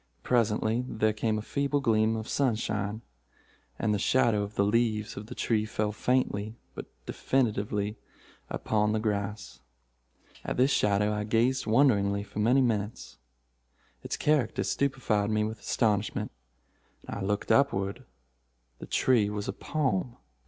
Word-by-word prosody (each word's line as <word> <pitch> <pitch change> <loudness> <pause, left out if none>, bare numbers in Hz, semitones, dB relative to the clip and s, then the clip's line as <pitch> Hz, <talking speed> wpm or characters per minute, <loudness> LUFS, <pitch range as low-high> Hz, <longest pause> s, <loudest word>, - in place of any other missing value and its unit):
Presently 115 0 +1
there 110 -2 +1
came 110 0 0
a 105 - -4
feeble 140 +3 0
gleam 110 -3 +2
of 110 0 -5
sunshine, 110 -4 -1 0.7
and 110 - 0
the 105 - 0
shadow 115 -2 +3
of 100 +1 -5
the 100 - +2
leaves 110 0 +1
of 105 +1 -7
the - - -8
tree 110 -2 +1
fell 110 -1 -2
faintly 110 -2 0 0.2
but - - -7 0.2
definitely 105 -4 -1 0.5
upon 105 0 0
the 110 - +1
grass. 105 - -3 0.8
At - - -3
this 130 +3 +4
shadow 105 -1 +2
I 105 0 -2
gazed 115 +4 +1
wonderingly 105 -5 +3
for 105 - -8
many 120 +6 +4
minutes. 110 - -2 0.8
Its - - -4
character 150 -3 +1
stupefied 120 -7 0
me 110 -1 +1
with 110 +1 -4
astonishment. 105 -3 0 0.8
I 100 - -5
looked 100 +3 -1
upward. 100 -6 +2 0.8
The - - -8
tree 115 -6 +3
was 105 -1 -4
a - - -2
palm. 125 -6 -1
110 Hz, 140 wpm, -28 LUFS, 105-120 Hz, 0.8 s, this